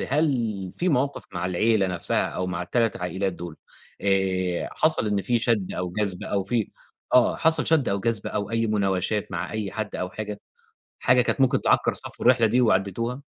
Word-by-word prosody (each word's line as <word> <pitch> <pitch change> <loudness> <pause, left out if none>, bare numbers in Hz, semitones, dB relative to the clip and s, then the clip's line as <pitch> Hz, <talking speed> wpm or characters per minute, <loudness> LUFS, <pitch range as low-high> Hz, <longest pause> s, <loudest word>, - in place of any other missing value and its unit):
هل 120 - 0
في 180 - +1
موقف 140 -1 0
مع 90 0 -2
العيلة 100 +3 +2
نفسها 90 -2 0
أو 90 - -3
مع 90 -1 -3
ال3 115 +3 0
عائِلات 95 +2 -2
دول، 85 -2 -8 0.4
آآ، 95 -2 0
حصل 155 -8 +2
إن 100 -1 0
في 120 +5 +1
شَد 110 -5 0
أو 90 -1 -3
جَذب 100 -3 -2
أو 100 -2 -1
في 115 -2 -1 0.4
آه، 125 -1 +5
حصل 160 0 +2
شَد 160 -5 +3
أو 100 0 0
جَذب 110 0 -1
أو 100 0 -3
أي 115 0 +1
مُناوشات 100 0 0
مع 90 +1 -3
أي 105 -3 -3
حد 110 -1 -4
أو 90 0 -3
حاجة، 105 -1 -6 0.6
حاجة 125 0 +4
كانت 135 - -1
ممكن 130 -2 +3
تعكّر - - +2
صفو - - -9
الرحلة 120 -2 +5
دي 120 +4 +2
وعديتوها؟ 115 +4 0
105 Hz, 185 wpm, -25 LUFS, 95-120 Hz, 0.6 s, آه